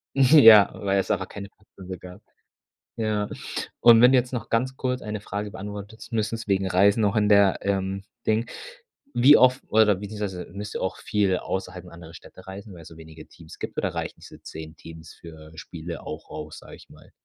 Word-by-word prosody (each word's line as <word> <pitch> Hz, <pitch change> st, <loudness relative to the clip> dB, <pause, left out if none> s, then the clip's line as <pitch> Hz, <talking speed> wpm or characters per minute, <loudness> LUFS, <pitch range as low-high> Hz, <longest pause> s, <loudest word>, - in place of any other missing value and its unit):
Ja, 130 Hz, -7 st, +7 dB
weil 100 Hz, -1 st, -1 dB
es 95 Hz, -, -2 dB
einfach 95 Hz, -2 st, -1 dB
keine 100 Hz, 0 st, -9 dB
passende 95 Hz, -2 st, -12 dB
gab. 90 Hz, +4 st, -12 dB, 0.8 s
Ja. 105 Hz, -2 st, -1 dB, 0.5 s
Und 115 Hz, -1 st, +7 dB
wenn 125 Hz, +2 st, +7 dB
du 130 Hz, -, +5 dB
jetzt 125 Hz, +1 st, -2 dB
noch 125 Hz, -, -5 dB
ganz 130 Hz, +3 st, -1 dB
kurz 125 Hz, -1 st, -3 dB
eine 105 Hz, 0 st, -5 dB
Frage 105 Hz, +1 st, -5 dB
beantwortest, 105 Hz, +2 st, -9 dB
müssen's 110 Hz, 0 st, -2 dB
wegen 95 Hz, -1 st, +1 dB
Reisen 100 Hz, +4 st, +3 dB
noch 105 Hz, +1 st, +1 dB
in 105 Hz, -1 st, +2 dB
der, 100 Hz, -2 st, +4 dB
ähm, 95 Hz, 0 st, -2 dB, 0.2 s
Ding 110 Hz, +2 st, 0 dB, 0.7 s
wie 135 Hz, +5 st, +7 dB
oft 130 Hz, +1 st, +4 dB
oder 105 Hz, -1 st, +4 dB
beziehungsweise 100 Hz, -2 st, -6 dB
müsst 105 Hz, +2 st, -7 dB
ihr -, -, -4 dB
auch 95 Hz, 0 st, -3 dB
viel 100 Hz, -3 st, 0 dB
außerhalb 90 Hz, -1 st, -6 dB
anderer 85 Hz, -1 st, -13 dB
Städte -, -, -15 dB
reisen, 95 Hz, +1 st, -10 dB
weil 85 Hz, -, -12 dB
es -, -, -13 dB
so 80 Hz, -, -15 dB
wenige 80 Hz, -1 st, -13 dB
Teams -, -, -15 dB
gibt, -, -, -7 dB
oder -, -, -2 dB
reichen -, -, -5 dB
diese -, -, -14 dB
10 80 Hz, 0 st, -10 dB
Teams 80 Hz, +1 st, -13 dB
für 80 Hz, -2 st, -14 dB
Spiele 85 Hz, +1 st, -8 dB
auch -, -, -8 dB
aus, 75 Hz, 0 st, -8 dB
sage -, -, -13 dB
ich -, -, -19 dB
mal? -, -, -18 dB
100 Hz, 195 wpm, -24 LUFS, 90-110 Hz, 0.8 s, Ja